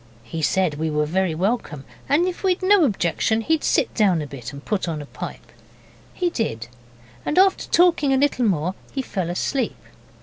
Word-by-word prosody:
He 160 +8 -5
said 165 -2 +1
we 160 0 0
were 150 0 +1
very 180 +1 0
welcome, 180 - -2 0.2
and 305 +5 +4
if 360 - -4
we'd 370 -1 +1
no 385 -3 +5
objection 215 - 0
he'd 320 +6 0
sit - - +1
down 195 -7 +3
a 150 - -3
bit 130 -4 -8
and 140 +1 -11
put 205 -4 -1
on 160 -2 -3
a 145 - -7
pipe. - - -8 0.6
He 355 -2 0
did, 115 - -3 0.6
and 300 - -2
after 380 0 +4
talking 340 -5 +4
a 265 - +3
little 270 -3 +2
more 180 -1 0 0.2
he 270 - -3
fell 185 -8 -3
asleep. 250 +9 -1
195 Hz, 190 wpm, -22 LUFS, -, 0.6 s, no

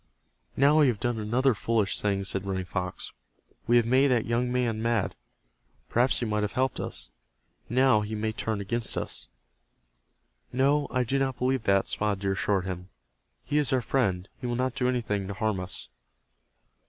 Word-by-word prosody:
"Now 145 +3 +5
we 150 - +6
have 115 -5 0
done 120 -3 -1
another 120 +5 +2
foolish 110 -2 0
thing," 100 -1 0
said 95 0 -2
Running 95 -1 -2
Fox. 90 0 -4 0.6
"We 120 +1 +5
have 120 - +4
made 130 +4 +4
that 125 -4 +2
young 120 +1 0
man 120 -3 0
mad. 115 -3 0 0.8
Perhaps 125 +3 +4
he - - 0
might 105 -1 0
have 105 0 -2
helped 130 0 0
us. - - -3 0.6
Now 130 -2 +4
he 105 +1 -4
may 110 +1 -1
turn 110 -1 -2
against 115 +3 -1
us." - - -4 1.2
"No, 140 +3 +2
I 125 -1 +1
do 135 +3 0
not 135 -2 -1
believe 130 -2 0
that," 100 -1 +3
Spotted 105 -2 -1
Deer 100 -1 0
assured 95 0 0
him. 90 0 -5 0.5
"He 150 - +1
is 145 - +1
our 130 - +3
friend. 100 -8 0
He 125 - -4
will 120 - -1
not 130 0 0
do 125 -1 0
anything 105 -6 -1
to 100 - -5
harm 110 -1 0
us." 90 -8 -4
115 Hz, 180 wpm, -27 LUFS, 100-125 Hz, 1.2 s, we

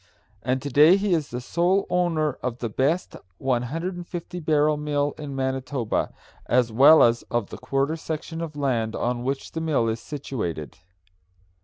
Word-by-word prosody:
and 130 +2 -1
to 145 - -4
day 155 +8 +7
he 200 -1 +1
is 155 -4 0 0.2
sole 180 +4 +2
owner 165 -5 +1
of 125 -2 -3
the 120 -2 -3
best 140 - 0 0.2
150 170 +8 -3
barrel 155 -1 +2
mill 145 -1 -1
in 145 -3 -7
Manitoba, 130 -2 -1 0.4
as 125 -1 +2
well 140 +8 +7
as 120 0 +3
of 120 -4 -2
the - - -6
quarter 140 +3 0
section 160 +1 -5
of 160 -3 -5
land 120 -6 -1
on 120 0 -1
which 135 +1 -3
the 160 - -4
mill 150 -8 +1
is 110 0 -1
situated. 105 - -5
145 Hz, 155 wpm, -25 LUFS, 125-160 Hz, 0.4 s, day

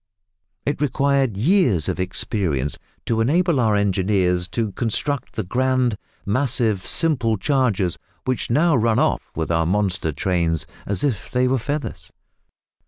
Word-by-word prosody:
It 145 +1 -2
required 140 -5 +1
years 125 - +2
of - - -2
experience 90 - -2 0.3
to 115 -1 0
enable 165 +4 +2
our 110 -3 +3
engineers 95 -3 +1
to 110 +3 -2
construct 130 +7 -1
the - - -2
grand, 130 +3 +1 0.3
massive, 110 -3 +1
simple 125 -10 +2
chargers 110 - 0 0.3
which 130 -1 -1
now 155 +6 +3
run 115 -2 +2
off - - +2
with 80 +1 -2
our 80 -1 +1
monster 95 -4 0
trains 80 +1 0 0.2
as 100 -3 0
if 125 -10 -1
they 125 0 +1
were 130 0 +1
feathers. 140 - -4
110 Hz, 135 wpm, -22 LUFS, 95-130 Hz, 0.3 s, our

